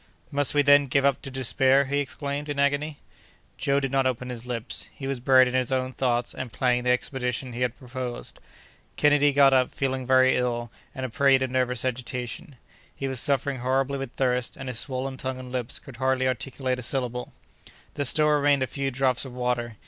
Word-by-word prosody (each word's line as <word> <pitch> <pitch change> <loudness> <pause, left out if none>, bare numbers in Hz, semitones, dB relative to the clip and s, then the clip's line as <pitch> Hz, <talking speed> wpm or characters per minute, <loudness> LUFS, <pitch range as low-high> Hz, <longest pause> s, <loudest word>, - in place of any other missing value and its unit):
"Must 145 0 +2
we, 145 - +4
then, 145 0 +5
give 135 +2 +1
up 140 - +2
to - - -5
despair?" 135 +1 +2
he 140 +2 -1
exclaimed, 145 +1 -4
in 145 - -3
agony. 145 +2 0 0.6
Joe 140 0 +1
did 135 -2 -3
not 135 -1 +2
open 125 0 -3
his 120 0 -6
lips. 120 -1 -3
He 135 - -8
was 135 -2 -2
buried 130 +1 +5
in 125 - -4
his 130 0 0
own 130 0 -1
thoughts, 120 -2 0
and 125 - -6
planning 125 0 +1
the - - +2
expedition 125 0 -1
he 120 - -5
had 125 0 -1
proposed. 125 -1 -6 0.6
Kennedy 145 -1 +4
got 140 -1 +5
up, 130 -1 +3
feeling 130 -2 -3
very 130 0 +5
ill, 120 -2 -2 0.2
and 130 -1 -4
a - - -4
prey 135 +3 +4
to 130 - -1
nervous 125 -1 0
agitation. 125 +2 -4 0.4
He 135 - -4
was 130 -2 +2
suffering 140 -1 +1
horribly 135 +2 0
with 135 -2 -6
thirst, 125 -2 -1
and 135 - -7
his 120 -2 -2
swollen 130 0 -3
tongue 130 0 -4
and 130 -1 -9
lips 125 -1 -2
could 130 -4 -11
hardly 130 0 +1
articulate 130 0 -2
a - - -5
syllable. 125 -1 -2 0.6
There 145 - -2
still 150 +3 +5
remained 145 -2 +3
a - - +1
few 135 +2 -3
drops 130 -1 0
of 130 -3 -9
water. 125 -2 -2
130 Hz, 205 wpm, -25 LUFS, 125-140 Hz, 0.6 s, then